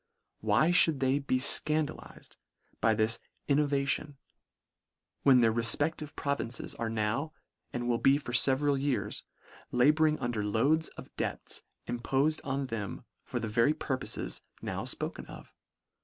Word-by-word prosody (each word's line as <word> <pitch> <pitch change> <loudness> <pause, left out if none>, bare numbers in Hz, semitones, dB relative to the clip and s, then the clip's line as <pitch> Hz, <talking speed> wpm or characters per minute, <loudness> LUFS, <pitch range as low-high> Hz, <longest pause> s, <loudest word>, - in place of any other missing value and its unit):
Why 110 +10 +2
mould 165 -4 +4
they 135 +1 +2
be 135 -2 0
fcandalized 150 +3 +1 0.4
by 110 -1 +3
this 110 +2 +1 0.3
innovati 140 -1 +2
on, 145 -2 -13 1.0
when 130 -3 +6
their 115 -1 +3
refpedlive 145 +7 0
provinces 140 -5 -3
are 115 - -3
now, 115 +8 -2 0.4
and 120 0 -3
will 120 -1 +1
be 135 +1 +4
for 140 -4 -7
feveral 135 +3 +3
years, 115 -8 -1 0.5
labouring 150 +5 +3
un 120 - -2
der 110 -3 -2
loads 140 +10 +2
of - - -11
debts - - -2 0.3
impofed 135 +6 0
on 135 0 -2
them 110 -6 -5 0.2
for 120 - -4
the 115 - -3
very 115 +8 +2
purpofes 135 -4 -3 0.2
now - - -4
fpoken - - -3
of - - -12
135 Hz, 140 wpm, -30 LUFS, 115-145 Hz, 1.0 s, when